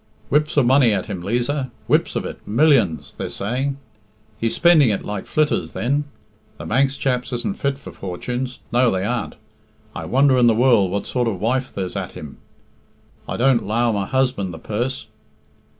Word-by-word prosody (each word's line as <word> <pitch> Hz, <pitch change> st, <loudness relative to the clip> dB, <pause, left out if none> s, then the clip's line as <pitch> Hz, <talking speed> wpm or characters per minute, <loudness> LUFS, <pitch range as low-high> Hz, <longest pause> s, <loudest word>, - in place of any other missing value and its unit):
"Whips 150 Hz, +1 st, +1 dB
of 140 Hz, -, +5 dB
money 130 Hz, -3 st, +5 dB
at 95 Hz, -3 st, -1 dB
him, 100 Hz, -5 st, -5 dB
Liza 125 Hz, +7 st, -1 dB, 0.2 s
whips -, -, +1 dB
of -, -, -2 dB
it -, -, -6 dB
millions, 115 Hz, -, +2 dB
they're -, -, -3 dB
saying." 130 Hz, +7 st, -2 dB, 0.6 s
"He's 115 Hz, 0 st, 0 dB
spending 165 Hz, -7 st, +5 dB
it 100 Hz, -, -2 dB
like 105 Hz, -2 st, -5 dB
flitters 145 Hz, -, 0 dB
then. 140 Hz, +5 st, 0 dB, 0.5 s
The -, -, -8 dB
Manx 135 Hz, +3 st, +1 dB
chaps 125 Hz, -2 st, -1 dB
isn't 125 Hz, +11 st, -3 dB
fit 140 Hz, -1 st, 0 dB
for 140 Hz, -, -10 dB
fortunes 125 Hz, +8 st, -5 dB
no, 125 Hz, +1 st, +4 dB
they 95 Hz, -2 st, -1 dB
aren't. 120 Hz, +1 st, -2 dB, 0.6 s
I -, -, -5 dB
wonder 135 Hz, 0 st, +3 dB
in 120 Hz, -, +5 dB
the 115 Hz, -, +4 dB
world 115 Hz, -5 st, +4 dB
what 100 Hz, +2 st, -2 dB
sort 125 Hz, -2 st, -1 dB
of 100 Hz, -5 st, -2 dB
wife 130 Hz, +5 st, 0 dB
there's 95 Hz, -2 st, -4 dB
at -, -, -4 dB
him. 75 Hz, -2 st, -9 dB, 0.9 s
I -, -, -3 dB
don't 125 Hz, -1 st, +3 dB
'low 115 Hz, +2 st, +1 dB
my 100 Hz, -2 st, -2 dB
husband 130 Hz, -8 st, 0 dB
the 80 Hz, -, -8 dB
purse. 120 Hz, +10 st, -3 dB
125 Hz, 180 wpm, -21 LUFS, 105-135 Hz, 0.9 s, of